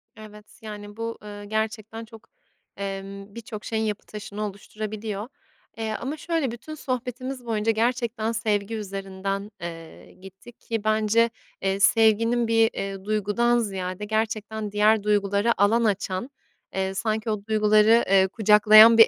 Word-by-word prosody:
Evet. 210 -1 -14
Yani, 205 -1 -8
bu, 230 0 -4
ııı, 205 0 -8
gerçekten 220 +1 -3
çok, 225 -1 -15 0.5
emm, 195 +1 -6
bir 235 - -6
çok 215 -2 -8
şeyin 220 -1 -1
yapı 210 -2 -3
taşını 210 0 -7
oluşturabiliyor. 210 +1 -5 0.5
Eee, 220 -1 -2
ama 280 +5 -4
şöyle 320 -5 -1
bütün 240 +7 -8
sohbetimiz 255 -1 -4
boyunca 225 -1 +1
gerçekten 230 -1 0
sevgi 220 -1 -1
üzerinden, 195 0 -4
eee, 165 -1 -9
gittik 195 +6 -14
ki 225 -2 -3
bence, 215 +2 +3 0.3
eee, 195 0 0
sevginin 225 +3 +4
bir, 225 0 +4
eee, 195 -1 -5
duygudan 215 +3 +2
ziyade 190 -2 -3
gerçekten 220 -1 -2
diğer 210 0 +3
duygulara 205 +2 +2
alan 225 +4 +4
açan, 200 +1 -1 0.5
eee, 190 0 -1
sanki 215 +2 -1
o 210 -2 -2
duyguları, 215 +1 +5
eee, 190 -1 +5
kucaklayan 215 +2 +7
bir 225 - +10
215 Hz, 140 wpm, -25 LUFS, 200-225 Hz, 0.5 s, bir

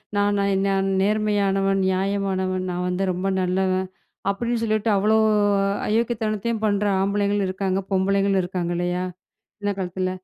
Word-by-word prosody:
நான் 205 0 +2
நான் 200 -1 +1
நான் 195 0 +1
நேர்மையானவன், 200 -2 +1
நியாயமானவன், 190 -1 -1
நான் 180 0 -2
வந்து 180 +2 -1
ரொம்ப 180 +2 -2
நல்லவன், 185 0 0 0.4
அப்டின்னு 235 +3 -1
சொல்லிட்டு, 215 0 0
அவ்ளோ 215 +3 +3 0.7
அயோக்கியத்தனத்தையும் 220 0 -1
பண்ற 205 0 +1 0.2
ஆம்பளைங்களும் 200 0 +1
இருக்காங்க. 190 0 -1
பொம்பளைங்களும் 195 0 +2
இருக்காங்க. 175 -1 -3
இல்லையா? 175 +1 -1 0.6
இந்த 205 - 0
காலத்துல. 185 0 -2
195 Hz, 125 wpm, -23 LUFS, 185-205 Hz, 0.7 s, அவ்ளோ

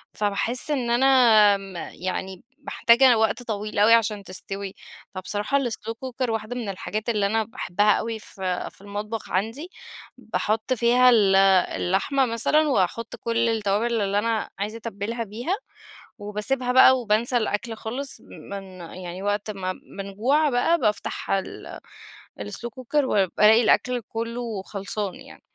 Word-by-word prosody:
فباحسّ 220 +7 -1
إن 250 -5 -1
أنا 235 -5 +5
م 195 -1 -11
يعني 185 +1 -5 0.2
محتاجة 235 0 +5
وقت 220 +3 +1
طويل 210 -2 -4
أوي 220 +3 +6
عشان 215 -3 +2
تستوي، 195 +1 -6 0.4
فبصراحة 205 +8 -1
الslow 235 -3 -3
cooker 255 0 -4
واحدة 225 +2 -3
من 230 -5 -4
الحاجات 215 +4 -4
اللي 210 -3 +1
أنا 220 +2 +1
باحبَّها 210 -1 0
أوي 225 -1 -3
في 185 -3 -4
في - - -21
المطبخ 210 +2 -6
عندي، 225 - -2 0.5
باحُط 220 +4 -1
فيها 245 +2 +4
ال 205 -5 +4 0.4
اللحمة 255 +9 +1
مثلًا 275 +7 +1
وأحُط 230 0 0
كل 230 0 0
التوابل 220 +1 0
اللي 200 +1 +1
أنا 225 0 -1
عايزة 210 +3 -3
أتبِّلها 230 +1 -4
بيها، 240 - -3 0.6
وباسيبها 210 +5 -1
بقى 260 0 +7
وبانسى 230 +3 +1
الأكل 225 0 -1
خالص، 265 +6 -5
من 195 -2 -10
يعني 180 +2 -8
وقت 205 +1 -1
ما 185 -2 -3 0.3
بنجوع 240 +11 +1
بقى 325 +8 +2
بافتح 210 -5 -2
ال 195 -1 -3 0.6
الslow 105 - -5
cooker 280 +3 0
وبالاقي 210 +1 +4
الأكل 250 +2 +2
كلَّه 230 -2 -4
خلصان 200 0 -4
يعني. - - -14
220 Hz, 135 wpm, -24 LUFS, 200-240 Hz, 0.6 s, بقى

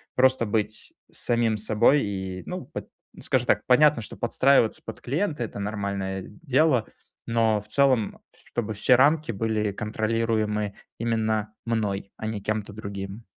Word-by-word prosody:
просто 130 -2 +4
быть 105 0 -2 0.2
самим 115 -2 0
собой. 110 +7 +3
И, 95 -2 -4
ну, - - -5
под - - -7 0.3
скажем - - +1
так, - - +3
понятно, 140 0 +5
что 105 - -8
подстраиваться 120 0 +3
под 110 - -8
клиента- 150 +1 -1
это 110 - -6
нормальное 100 -2 -3
дело, 145 -6 +1 0.4
но 115 -2 +2
в 105 - -16
целом, 130 -3 +2 0.2
чтобы 110 -2 -4
все 105 +5 +4
рамки 145 +2 +3
были 110 0 -1
контролируемы 110 0 -1 0.2
именно 110 -2 -1
мной, 105 -4 -2
а - - -6
не 110 -2 -3
кем-то 105 0 -3
другим. 100 0 -6
110 Hz, 140 wpm, -26 LUFS, 105-120 Hz, 0.4 s, понятно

